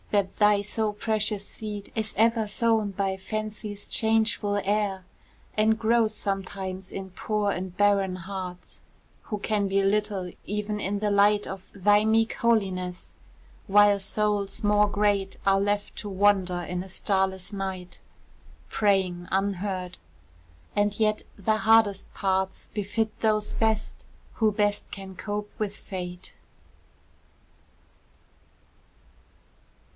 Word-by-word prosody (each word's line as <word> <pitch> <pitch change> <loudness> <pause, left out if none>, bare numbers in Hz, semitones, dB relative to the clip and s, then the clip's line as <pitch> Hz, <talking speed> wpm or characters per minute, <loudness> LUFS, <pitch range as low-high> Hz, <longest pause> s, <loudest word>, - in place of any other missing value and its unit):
that 200 -2 +1
thy 210 -1 +5
so 215 +1 -1
precious 210 -1 -1
seed 210 -2 -7
Is 220 -1 -2
ever 225 0 +3
sown 220 0 +2
by 195 0 -1
Fancy's 210 +1 -4
changeful 220 -2 +1
air, 200 -2 0 0.5
And 220 +1 +3
grows 225 0 +2
sometimes 190 -1 -4
in 190 -1 -6
poor 210 +2 -1
and 185 -1 -5
barren 200 -2 +3
hearts, 185 0 -7 0.4
Who 210 - -3
can 205 0 0
be 195 +1 +2
little 195 -2 0
even 210 0 -3
in 200 0 -1
the 210 0 0
light 205 +1 +4
Of 190 -1 -8
thy 205 +2 +4
meek 220 +1 +3
holiness 190 -6 0 0.5
while 205 0 +6
souls 205 +1 -1
more 210 0 +4
great 205 -2 +1
Are 195 0 +4
left 205 0 -1
to 205 - -4
wander 190 -2 +2
in 180 +1 -3
a 190 - -12
starless 190 0 -1
night, 190 -2 -4 0.7
Praying 190 -4 +1
unheard 190 -1 -1 0.8
and 205 0 +1
yet 215 -1 +2 0.2
the 215 +2 +1
hardest 220 -3 +3
parts 190 -1 -1
Befit 215 +1 -2
those 215 -1 +1
best 220 -1 0 0.3
who 220 -2 +2
best 205 0 0
can 195 -1 -8
cope 210 +2 -4
with 210 -1 -2
Fate. 180 -2 -7
205 Hz, 120 wpm, -26 LUFS, 190-215 Hz, 0.8 s, while